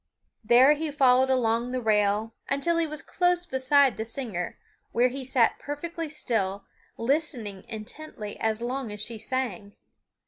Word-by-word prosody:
There 250 +6 +6
he 310 +1 -3
followed 265 -2 +4
along 235 -2 +1
the 255 0 -2
rail 215 -1 +1 0.2
until 280 +5 +1
he 330 - +1
was 305 -1 -6
close 355 -1 +1
beside 265 -2 +3
the 220 - -2
singer, 225 -7 -4 0.4
where 245 +2 +4
he 265 +2 -6
sat 250 -3 +2
perfectly 325 +2 -5
still, 205 -9 -2 0.3
listening 235 - -2
intently 220 0 -8
as 220 +1 0
long 250 -1 -3
as 210 - -7
she 220 +2 -3
sang. 215 -5 -4
250 Hz, 145 wpm, -27 LUFS, 220-285 Hz, 0.4 s, There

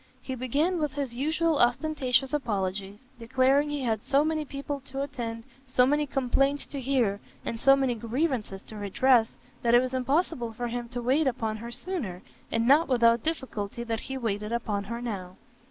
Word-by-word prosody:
He 260 - -6
began 285 +8 0
with 300 -3 -1
his 280 -4 -3
usual 310 +4 +1
ostentatious 260 0 +2
apologies, 205 -4 -2
declaring 260 +5 +2
he 290 -2 -2
had 220 -3 0
so 285 +2 +3
many 310 -1 -1
people 280 0 -5
to 270 +1 -3
attend, 230 -4 -5 0.2
so 255 -1 +4
many 295 +2 +2
complaints 275 +2 +1
to 280 - -5
hear, 240 -6 +1 0.3
and 230 - -3
so 275 0 +7
many 265 -2 +1
grievances 235 -3 -2
to 220 - -10
redress, 225 +4 +3 0.3
that 235 0 +4
it - - +8
was 255 +1 -2
impossible 260 -2 0
for 240 +2 -3
him 240 0 -4
to 245 0 -5
wait 275 +5 +3
upon 225 -3 -1
her 235 +2 -7
sooner, 240 - -4 0.3
and 230 +1 +1
not 295 +5 +6
without 235 -2 +4
difficulty 235 -8 -3
that 225 -1 -2
he 265 +2 -5
waited 210 -3 -2
upon 215 -4 -1
her 235 +3 -5
now. 190 -6 -5
250 Hz, 180 wpm, -28 LUFS, 230-280 Hz, 0.3 s, it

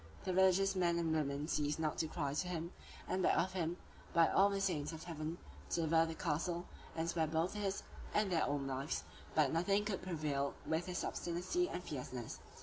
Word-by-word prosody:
The 185 - -1
religious 190 +1 +5
men 175 -2 +3
and 165 -2 +1
women 145 -1 0
ceased 150 -2 +1
not 155 -2 0
to 160 - +1
cry 145 -3 -2
to 165 +5 -1
him, 170 -1 -3 0.4
and 185 - 0
beg - - +4
of 185 +1 +1
him, 175 -1 -1 0.4
by 165 -1 +6
all 200 +1 +5
the 200 0 -1
saints 165 -6 0
of 160 -1 -7
heaven, 160 0 -4 0.3
to - - +1
deliver 165 0 +4
the 165 - -4
castle, 170 +2 -1 0.3
and 165 0 -1
spare 165 -2 +1
both 160 +3 +1
his 200 -2 -1 0.3
and 210 -2 +2
their 165 - +3
own 145 -1 0
lives; 135 +2 -2 0.3
but 150 -3 +4
nothing 195 +5 +2
could 205 -3 -1
prevail 150 -6 -1
with 160 +3 0
his 180 -1 -2
obstinacy 180 - -1
and 180 - -4
fierceness. 125 -6 -5
165 Hz, 200 wpm, -37 LUFS, 155-185 Hz, 0.4 s, by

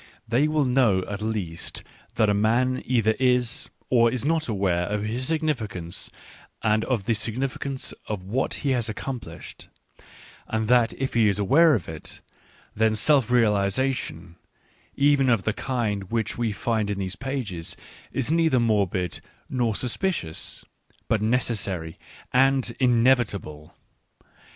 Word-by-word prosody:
They 125 +6 +2
will 155 -2 +1
know, 125 -7 +3
at 100 0 -5
least, 100 -7 -3 0.3
that 110 -1 +3
a 105 - +3
man 120 +5 +2
either 115 -3 +3
is, 125 -2 +2 0.2
or 115 -2 +5
is 125 +1 -2
not, 160 +1 +1
aware 95 -5 0
of 105 0 -2
his 120 +4 -2
significance 115 - -2 0.5
and 110 0 +2
of 115 -7 -1
the 115 - +2
significance 130 +4 -2
of 105 -4 -4
what 115 +8 -1
he 140 - +2
has 120 -3 0
accomplished, 110 - -7 0.8
and 110 -1 -1
that 120 -1 +4
if 135 0 -3
he 115 -3 +4
is 100 - 0
aware 145 - +5
of 95 - -4
it, 80 -1 -7 0.5
then 110 0 +2
self 135 0 +3
realisation, 105 -5 0 0.6
even 140 -2 +3
of 115 -5 +2
the 110 - 0
kind 110 -6 -2
which 115 -2 -1
we 115 -2 -1
find 110 0 -1
in 100 - -2
these 95 -1 -3
pages, 125 -11 -4 0.3
is 135 +2 -1
neither 160 -5 +3
morbid 100 -6 0 0.3
nor 120 -4 0
suspicious, 120 - -2 0.4
but 110 - +2
necessary 105 -8 -1 0.3
and 130 -2 +3
inevitable. 115 - +1
115 Hz, 135 wpm, -25 LUFS, 100-130 Hz, 0.8 s, or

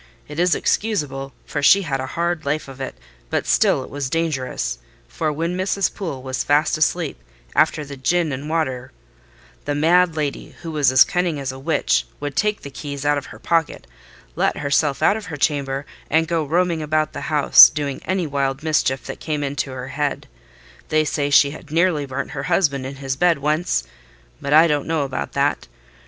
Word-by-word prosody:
It 150 +2 -7
is 180 +1 +3
excusable, 145 -11 -1
for 145 - -3
she 195 +7 +6
had 135 -5 -2
a 130 - -4
hard 170 +2 -2
life 145 +2 -2
of 135 0 -10
it: 135 - -5 0.3
but - - -1
still - - +3
it - - -11
was 140 -2 -3
dangerous; 130 - -2 0.3
for 155 - -2
when 165 +4 -2
Mrs. 190 +1 0
Poole 165 -10 -5
was 130 -1 -2
fast 145 +2 +2
asleep 155 - 0 0.4
after 150 - +2
the 140 0 -8
gin 160 +4 0
and 140 +3 -5
water, 130 -6 -2 0.7
the 145 - -1
mad 170 +3 +3
lady, 150 -3 -4
who 165 - -5
was 145 -4 +2
as 130 -1 +8
cunning 175 -4 -1
as 135 -2 -3
a 130 - -10
witch, - - +1
would 145 -2 -5
take 210 +4 0
the 140 - -8
keys 140 0 -6
out 145 0 +3
of 140 - -12
her - - -11
pocket, 165 -2 -1 0.5
let - - +1
herself 140 -1 0
out 205 - +4
of 215 - -8
her 155 -4 -6
chamber, 140 -2 -1 0.2
and 160 +2 +2
go 165 -2 0
roaming 170 +2 0
about 155 0 0
the - - -6
house, 150 -2 +8
doing 145 -3 -4
any 185 0 -1
wild 140 -1 -2
mischief 150 -4 +1
that 135 - -7
came 150 -2 -3
into 140 0 -2
her 130 0 -6
head. 145 0 -2 0.6
They 155 0 +2
say 145 -1 -1
she 140 0 +5
had 155 +1 -11
nearly 160 -2 +1
burnt 135 +1 -4
her 140 - -4
husband 140 -7 +1
in 135 - -7
his 135 -1 -3
bed 175 +2 +3
once: 150 - 0 0.6
but 140 - -4
I 155 +2 +7
don't 150 -3 0
know 160 -2 0
about 130 - -4
that. - - 0
145 Hz, 195 wpm, -21 LUFS, 135-165 Hz, 0.7 s, as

